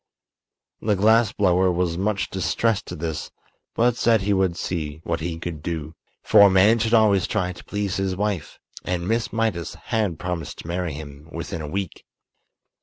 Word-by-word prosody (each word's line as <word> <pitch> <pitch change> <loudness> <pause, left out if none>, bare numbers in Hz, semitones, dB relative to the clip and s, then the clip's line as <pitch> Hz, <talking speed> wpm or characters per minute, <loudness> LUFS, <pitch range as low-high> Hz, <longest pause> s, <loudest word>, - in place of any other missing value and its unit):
The 105 -1 +1
glass 110 +2 +4
blower 95 -2 +3
was 85 -1 0
much 100 +2 -1
distressed 95 +4 0
at - - -5
this, 80 -1 -4 0.5
but 120 +1 +3
said 115 -3 +3
he 100 +1 +1
would 95 -3 +1
see 75 -4 -3
what 85 - -2
he 80 +1 -3
could 80 -2 -6
do. 80 -1 -4 0.3
For - - +6
a 100 - +9
man 100 +5 +5
should 115 +1 +2
always 105 -4 +4
try 90 0 -1
to 85 - -13
please 105 -2 -2
his 95 -1 -1
wife, 100 -6 -2 0.3
and 90 -1 -2
Miss 115 +1 0
Mydas 110 -8 -1
has 105 -6 -1
promised 90 -1 -4
to - - -9
marry 85 -2 -2
him 75 +1 -10
within 85 -1 -5
a 75 - -5
week. 95 0 -4
95 Hz, 180 wpm, -23 LUFS, 85-105 Hz, 0.5 s, a